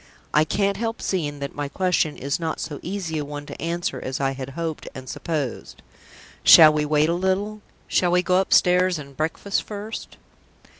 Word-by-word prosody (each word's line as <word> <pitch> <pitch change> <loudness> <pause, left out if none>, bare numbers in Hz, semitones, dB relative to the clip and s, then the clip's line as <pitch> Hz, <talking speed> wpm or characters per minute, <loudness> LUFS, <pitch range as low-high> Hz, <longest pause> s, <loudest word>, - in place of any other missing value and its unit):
"I 155 +1 +4
can't 200 +4 0
help 225 0 -3
seeing 150 -6 -2
that 140 - -4
my 145 -1 -3
question 180 -2 0
is 140 +4 -2
not 160 -1 -3
so 150 -2 -5
easy 175 -4 -3
a - - -2
one 145 0 -7
to - - -9
answer 170 -5 -2
as 130 0 -4
I 135 -1 +1
had 135 0 -6
hoped 165 -2 -4
and 130 0 -9
supposed. 145 -4 -4 0.6
Shall 155 -2 +9
we 150 0 0
wait 150 0 +3
a - - +2
little? 190 +4 -1 0.3
Shall 180 - +2
we 180 +1 +3
go 185 0 +2
upstairs 180 -1 +3
and 140 -2 -10
breakfast 160 +7 -1
first?" 210 +1 -7
165 Hz, 185 wpm, -23 LUFS, 145-185 Hz, 0.6 s, Shall